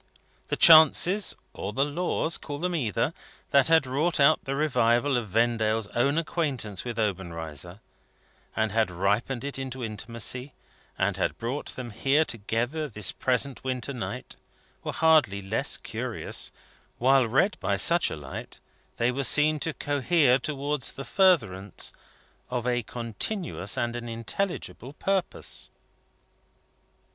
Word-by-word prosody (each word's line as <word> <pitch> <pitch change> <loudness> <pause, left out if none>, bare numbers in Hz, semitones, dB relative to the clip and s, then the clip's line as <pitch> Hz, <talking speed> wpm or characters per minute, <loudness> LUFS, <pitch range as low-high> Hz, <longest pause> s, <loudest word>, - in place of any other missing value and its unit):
The - - -1
chances, 170 +5 +6 0.2
or 100 - -5
the 135 +5 +2
laws 165 +2 -1
call 145 -1 -6
them 180 +4 -2
either 120 - 0 0.4
that 140 -2 +5
had 160 -3 +5
wrought 150 +7 0
out 145 +2 +4
the 135 - -2
revival 140 -2 +2
of 120 -4 -2
Vendale's 115 0 +1
own 140 +5 +1
acquaintance 140 - -2
with 120 -2 -5
Obenreizer, 85 -3 -4 0.7
and 110 -1 0
had 110 -1 +2
ripened 105 +8 -1
it 140 -1 -4
into 130 -1 -5
intimacy, 115 +4 -4 0.4
and - - 0
had - - -1
brought 125 +5 -4
them 125 -2 -6
here 135 +8 +2
together 120 +7 -2
this 105 -5 -2
present 130 +1 0
winter 130 +1 -3
night, 120 - -6 0.5
were - - -3
hardly 155 -11 +3
less 95 -1 -1
curious; - - -4 0.5
while 130 0 +4
read 135 - +2
by 100 +1 0
such 170 - +4
a - - -4
light, 75 -3 -8 0.4
they 120 +1 +2
were 135 +2 -2
seen 150 +4 +4
to 165 - -1
cohere 145 -2 +2
towards 145 0 -3
the 135 - -7
furtherance 110 - +1 0.6
of 125 -1 -2
a 120 -1 +1
continuous 115 - -3
and 120 0 -1
an 120 -1 -5
intelligible 130 - -4
purpose. 195 +3 -3
125 Hz, 135 wpm, -27 LUFS, 115-150 Hz, 0.7 s, chances